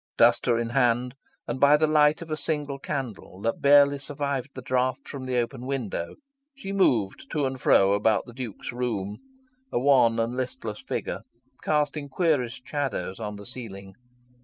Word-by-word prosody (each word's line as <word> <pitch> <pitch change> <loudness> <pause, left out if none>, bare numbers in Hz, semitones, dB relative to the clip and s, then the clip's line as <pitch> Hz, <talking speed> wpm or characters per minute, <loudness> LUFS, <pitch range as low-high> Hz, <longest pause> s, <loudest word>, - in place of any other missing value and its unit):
Duster 120 0 +4
in 115 0 -1
hand, 125 -1 +2 0.3
and 120 +2 -3
by 145 +2 +6
the 155 - +3
light 150 +1 +3
of 160 - -11
a - - +1
single 145 -2 -2
candle 130 -10 -5
that 115 +1 -1
barely 140 0 +6
survived 140 -1 -3
the 130 - -6
draught 130 +1 0
from 135 -3 -6
the 130 -1 -1
open 125 +1 -2
window, 120 -11 -3 0.4
she 195 -8 -6
moved 120 - +1
to 150 -3 +1
and 130 -1 -3
fro 95 0 +5
about 105 +1 +2
the 120 - -12
Duke's 120 -5 -6
room, 115 -5 -3 0.5
a - - +1
wan 125 -4 +4
and 115 +1 0
listless 125 -4 -4
figure, - - -4 0.4
casting 150 -1 0
queerest 135 -6 0
shadows 125 -11 -3
on 105 -2 -4
the 100 0 -10
ceiling. 100 -6 -9
130 Hz, 165 wpm, -26 LUFS, 115-140 Hz, 0.5 s, by